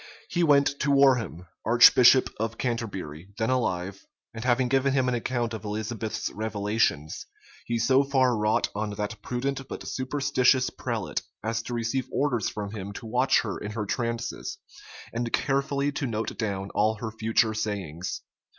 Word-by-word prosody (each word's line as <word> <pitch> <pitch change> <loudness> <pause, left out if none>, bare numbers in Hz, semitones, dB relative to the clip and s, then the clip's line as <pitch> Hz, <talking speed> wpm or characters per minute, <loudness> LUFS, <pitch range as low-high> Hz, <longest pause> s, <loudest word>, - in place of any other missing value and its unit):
He 175 - +1
went 140 -2 +4
to 140 - 0
Warham, 130 - +3 0.2
archbishop 120 +2 +7
of 115 0 -2
Canterbury, 95 - -4
then 110 +2 0
alive; 100 -6 -1 0.3
and 115 0 -6
having 125 0 +2
given 135 +1 +2
him 130 -2 +2
an 125 - +1
account 120 -1 -1
of 110 -2 -6
Elizabeth's 110 +1 -3
revelations, 105 -7 -1 0.4
he 120 - 0
so 130 +4 +4
far 130 -3 +2
wrought 105 0 +1
on 105 +1 -2
that 105 +1 -4
prudent 135 +3 -3
but - - -7
superstitious 130 -1 +1
prelate, - - -3 0.2
as 115 +1 -1
to 120 +1 -5
receive 120 +3 -2
orders 130 -5 0
from 105 -1 -5
him 100 -2 -6
to 115 - -8
watch 125 +4 +3
her 105 -4 -4
in 105 0 -6
her 105 -1 -3
trances, 115 +2 -3 0.6
and 115 0 -2
carefully 140 0 0
to 140 -1 -3
note 110 -1 -3
down 100 -3 -3
all 110 +1 +2
her 110 +1 -5
future 110 0 +1
sayings. 95 -6 -4
115 Hz, 160 wpm, -27 LUFS, 105-130 Hz, 0.6 s, archbishop